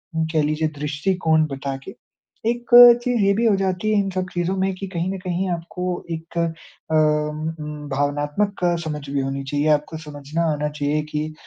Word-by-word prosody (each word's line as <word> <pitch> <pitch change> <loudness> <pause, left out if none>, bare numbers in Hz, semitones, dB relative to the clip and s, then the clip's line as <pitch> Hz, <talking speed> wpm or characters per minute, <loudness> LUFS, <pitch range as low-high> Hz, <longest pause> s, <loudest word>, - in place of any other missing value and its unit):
उम, 160 0 +1
कह 155 -1 +3
लीजिए 155 +1 0
दृष्टिकोण 160 +2 +1
बताके। 135 +5 -5 0.5
एक 240 0 -3 0.3
चीज़ 245 -2 +1
ये 200 - +4
भी 230 +4 +1
हो 220 -3 +4
जाती 190 +2 -1
है 210 - +3
इन 195 -1 0
सब 185 0 -2
चीज़ों 175 +2 -1
में 190 0 0
कि 195 +1 -6
कहीं 180 0 -2
न - - -4
कहीं 180 +1 -2
आपको 175 +1 -4
एक 165 +1 -6
अ, 165 -1 -4
उम 150 0 +1
उम, 150 -1 -7
भावनात्मक 145 +8 -1 0.2
समझ 150 -2 -5
भी 140 0 -1
होनी 135 +1 -3
चाहिए, 145 +2 -1
आपको 150 +1 +1
समझना 150 +2 -4
आना 150 0 -2
चाहिए 150 0 -1
कि 155 +1 -3
160 Hz, 185 wpm, -22 LUFS, 150-185 Hz, 0.5 s, ये